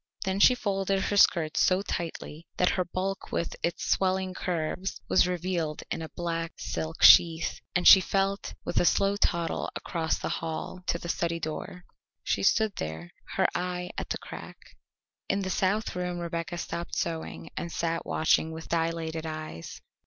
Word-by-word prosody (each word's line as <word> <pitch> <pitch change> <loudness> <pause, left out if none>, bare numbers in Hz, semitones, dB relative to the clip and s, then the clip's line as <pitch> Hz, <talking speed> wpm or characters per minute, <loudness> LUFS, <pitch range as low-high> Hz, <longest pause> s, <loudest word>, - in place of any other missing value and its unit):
Then 190 +1 -1
she 250 +4 +7
folded 195 -3 0
her 205 - -1
skirts 170 -5 +4
so 185 +1 +3
tightly 170 -3 -5
that 180 - +3
her 185 - +1
bulk 185 +2 -4
with 170 - -2
its 170 - -2
swelling 190 0 +1
curves 180 +1 -3
was 185 - +4
revealed 175 -3 -2
in - - -2
a 160 - -6
black 165 -1 -3
silk 160 +1 -4
sheath, 165 -1 +7 0.2
and 180 - +3
she 190 - +10
went 195 0 0
with - - +1
a - - +3
slow 195 +3 +3
toddle 170 -4 0
across 165 -3 -1
the - - -4
hall 165 +2 -5
to - - +1
the 170 - -8
study 170 0 -1
door. 165 +3 -6 0.4
She - - 0
stood 220 -3 +2
there, 80 +2 -5 0.2
her - - +3
eye 180 0 -3
at - - -4
the - - -1
crack. - - -9 0.7
In 195 0 +1
the 190 - -2
south 195 +3 0
room 180 -1 -2
Rebecca 170 0 -4
stopped 170 0 -4
sewing 165 -1 -4
and 170 - -4
sat 165 0 -1
watching 160 0 +2
with 160 0 -8
dilated 165 -1 -1
eyes. 155 - -7
170 Hz, 165 wpm, -28 LUFS, 165-190 Hz, 0.7 s, she